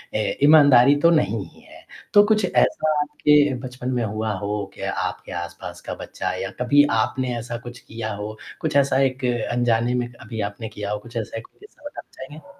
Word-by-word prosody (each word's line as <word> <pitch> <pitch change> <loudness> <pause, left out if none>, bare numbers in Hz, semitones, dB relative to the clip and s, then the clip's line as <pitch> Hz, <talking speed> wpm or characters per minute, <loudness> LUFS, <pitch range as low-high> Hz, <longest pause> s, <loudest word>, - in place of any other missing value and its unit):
अ, - - +2 0.3
ईमानदारी 145 -3 +7
तो 170 - +6
नहीं 110 - +1
ही - - -21
है, - - -16 0.3
तो 205 - +8
कुछ 215 -2 +2
ऐसा 155 -3 +1
आपके 150 -1 +3
बचपन 125 0 -6
में 120 -2 0
हुआ 110 +1 -2
हो 105 0 -3
कि - - -12
आपके - - -3
आसपास 85 - -9
का - - -6
बच्चा - - -5
या - - -4
कभी 145 +4 +5
आपने 120 +3 0
ऐसा 120 0 -5
कुछ 120 0 -9
किया 110 -1 -6
हो, 105 +1 -6 0.2
कुछ 155 -3 -2
ऐसा 140 -1 +3
एक 130 0 -1 0.3
अनजाने 120 0 +1
में 120 -1 -1
अभी 115 -1 -7
आपने 110 +2 -8
किया 105 -1 -6
हो, 105 - -2
कुछ 120 +2 -10
ऐसा 115 0 -4
एक 115 - -8
कोई - - -36
किस्सा 415 -7 -19
बताना 290 - -9
चाहेंगे? 150 +7 -12
125 Hz, 200 wpm, -22 LUFS, 110-145 Hz, 0.3 s, तो